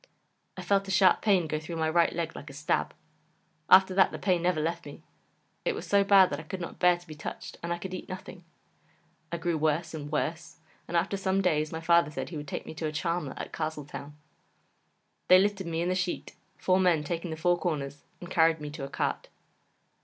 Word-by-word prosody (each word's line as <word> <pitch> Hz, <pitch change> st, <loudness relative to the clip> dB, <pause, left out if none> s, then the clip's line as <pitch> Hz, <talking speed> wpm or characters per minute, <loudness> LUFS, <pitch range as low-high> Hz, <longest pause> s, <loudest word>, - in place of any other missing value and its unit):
I -, -, -6 dB
felt 200 Hz, -1 st, +1 dB
a -, -, -6 dB
sharp 190 Hz, 0 st, +4 dB
pain 195 Hz, -5 st, +3 dB
go 155 Hz, 0 st, -2 dB
through 160 Hz, +2 st, -7 dB
my 160 Hz, -1 st, 0 dB
right 170 Hz, +1 st, +3 dB
leg 165 Hz, -1 st, -3 dB
like 145 Hz, -, -9 dB
a -, -, -10 dB
stab. 145 Hz, +2 st, -1 dB, 0.7 s
After 190 Hz, 0 st, +7 dB
that 190 Hz, 0 st, +4 dB
the -, -, -5 dB
pain 180 Hz, -3 st, +1 dB
never 175 Hz, -2 st, +1 dB
left 165 Hz, +2 st, -2 dB
me; -, -, -11 dB, 0.6 s
it -, -, 0 dB
was 435 Hz, -, -6 dB
so 200 Hz, 0 st, +4 dB
bad 195 Hz, -2 st, +6 dB
that -, -, -3 dB
I -, -, -11 dB
could 190 Hz, -1 st, -4 dB
not 170 Hz, -, -7 dB
bear 180 Hz, -1 st, +5 dB
to 175 Hz, -, -17 dB
be 160 Hz, -, -9 dB
touched, 150 Hz, -, -8 dB
and 170 Hz, -, -4 dB
I 170 Hz, -, 0 dB
could 185 Hz, +1 st, -7 dB
eat 185 Hz, -, -7 dB
nothing. 185 Hz, -1 st, -8 dB, 0.9 s
I 170 Hz, -, -2 dB
grew 165 Hz, -1 st, -1 dB
worse 155 Hz, +2 st, 0 dB
and 145 Hz, -2 st, -6 dB
worse, 160 Hz, +2 st, -3 dB, 0.3 s
and 170 Hz, -, 0 dB
after 195 Hz, +4 st, 0 dB
some 190 Hz, 0 st, 0 dB
days 155 Hz, -5 st, +1 dB
my 160 Hz, -, -5 dB
father 170 Hz, -2 st, +4 dB
said 150 Hz, -, -5 dB
he 165 Hz, -, -6 dB
would 150 Hz, 0 st, -7 dB
take -, -, -5 dB
me -, -, -7 dB
to 160 Hz, 0 st, -3 dB
a -, -, -3 dB
Charmer 155 Hz, -1 st, -2 dB
at -, -, -7 dB
Castletown. 150 Hz, -2 st, -5 dB, 1.1 s
They 185 Hz, -, +8 dB
lifted 195 Hz, -1 st, +1 dB
me 165 Hz, 0 st, -1 dB
in 175 Hz, -, 0 dB
the -, -, +2 dB
sheet, 185 Hz, -1 st, -3 dB, 0.2 s
four 185 Hz, 0 st, +2 dB
men 175 Hz, -5 st, +3 dB
taking 170 Hz, +3 st, -3 dB
the 160 Hz, -, -5 dB
four 175 Hz, +2 st, +2 dB
corners, 145 Hz, -5 st, -3 dB, 0.2 s
and 175 Hz, -, -8 dB
carried 165 Hz, -2 st, +4 dB
me 150 Hz, -1 st, -6 dB
to 150 Hz, -2 st, -7 dB
a 135 Hz, -, -5 dB
cart. -, -, -2 dB
170 Hz, 230 wpm, -28 LUFS, 155-185 Hz, 1.1 s, They